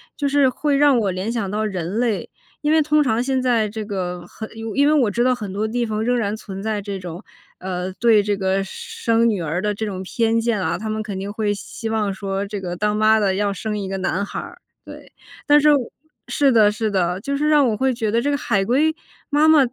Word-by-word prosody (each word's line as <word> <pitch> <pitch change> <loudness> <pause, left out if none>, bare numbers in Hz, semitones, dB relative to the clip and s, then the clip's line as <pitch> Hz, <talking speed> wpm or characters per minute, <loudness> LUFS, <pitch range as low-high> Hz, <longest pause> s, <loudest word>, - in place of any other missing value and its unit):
就 285 -1 -1
是 280 -1 +4
会 285 +2 0
让 285 -3 +5
我 205 -3 0
联 185 +5 -3
想 225 -5 -2
到 215 +2 -1
人 190 0 -3
类。 235 -4 -1 0.3
因 295 - +1
为 315 0 +5
通 300 0 +3
常 235 -3 +1
现 265 0 0
在 235 -4 +2
这 215 +1 -5
个 180 -4 -4
很 220 - -8 0.3
因 285 +1 +4
为 300 - +4
我 255 -9 +3
知 240 +4 +1
道 255 0 +3
很 210 -5 -6
多 210 +2 -1
地 240 +2 -1
方 215 -1 -2
仍 245 +2 +1
然 210 -3 -1
存 195 -3 -8
在 215 -1 -1
这 200 -1 -5
种 180 +1 -8 0.4
呃， 185 0 -4
对 225 +1 +4
这 205 0 0
个 195 0 0
生 230 +4 0
女 210 -4 -1
儿 165 +2 -2
的 210 +1 0
这 220 - -5
种 190 -2 -5
偏 225 +3 +1
见 230 -2 0
啊， 170 -2 -1
他 215 +3 -5
们 215 0 -2
肯 200 -4 -5
定 200 +1 -4
会 210 -1 -1
希 225 +2 -6
望 215 -2 0
说 195 0 -3
这 205 0 -5
个 175 -2 -4
当 210 +3 0
妈 215 +1 +4
的 200 -3 +1
要 205 +1 0
生 210 +2 -4
一 195 - -4
个 195 0 -3
男 190 +1 -1
孩， 350 +11 -7 0.3
对。 - - -12 0.3
但 295 0 +6
是 300 +1 +6
我 260 -4 -2 0.4
是 280 -2 +2
的， 215 -3 +5
是 220 +1 -2
的， 185 -2 0
就 280 +5 -2
是 300 +2 0
让 295 -3 +5
我 215 - -1
会 265 +3 +1
觉 225 -2 -2
得 230 +2 +2
这 285 +5 0
个 285 - +1
海 200 -7 0
龟 300 +8 +2 0.3
妈 300 0 +3
妈 315 -1 +7
215 Hz, 265 characters per minute, -21 LUFS, 195-250 Hz, 0.4 s, 妈